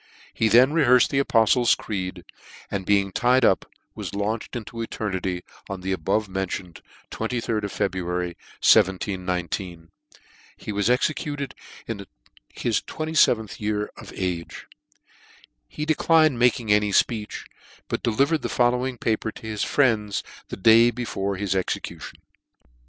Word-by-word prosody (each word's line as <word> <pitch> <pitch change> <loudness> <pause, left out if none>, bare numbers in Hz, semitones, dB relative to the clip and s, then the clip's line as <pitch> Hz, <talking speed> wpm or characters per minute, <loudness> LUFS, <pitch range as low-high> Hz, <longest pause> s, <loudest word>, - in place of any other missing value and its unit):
He 110 - +1
then 125 +6 +6
rehearfed 125 -6 +4
the 140 0 +2
apoftle's 115 0 +4
creed, 90 -3 -5 0.5
and 95 -2 -3
being 100 -1 +2
tied 125 +4 +3
up, 95 - +2 0.3
was - - -6
launched 110 +4 -3
into 115 0 -7
eter* 110 -3 -3
nity, 90 -1 -3 0.3
on 95 -1 -5
the 95 +1 -3
above 95 +4 0
mentioned 95 -2 -4 0.3
ajd 110 -1 -2
of 100 - -3
February, 90 -1 -2 0.3
1719. 90 -2 +1 0.7
He - - -6
was 105 +2 0
executed 145 +2 -1 0.3
in 115 - -4
the 100 -1 -10 0.8
27 155 -8 +2
th - - -11
year 105 0 -2
of - - -11
his - - -10
age. 90 -2 -4 1.0
He 150 - -5
declined 155 -3 +3
making 120 -3 +3
any 105 0 +2
fpeech, 105 +1 0 0.4
but - - -3
delivered 140 +8 +1
the - - -3
following 125 +1 +1
paper 110 -1 -1
to - - -12
his 110 -2 -2
friends 110 -7 +1 0.2
the - - -7
day 115 +4 +6
before 105 -5 -3
his 95 -1 -2
execution. 95 - -4
105 Hz, 135 wpm, -24 LUFS, 95-120 Hz, 1.0 s, then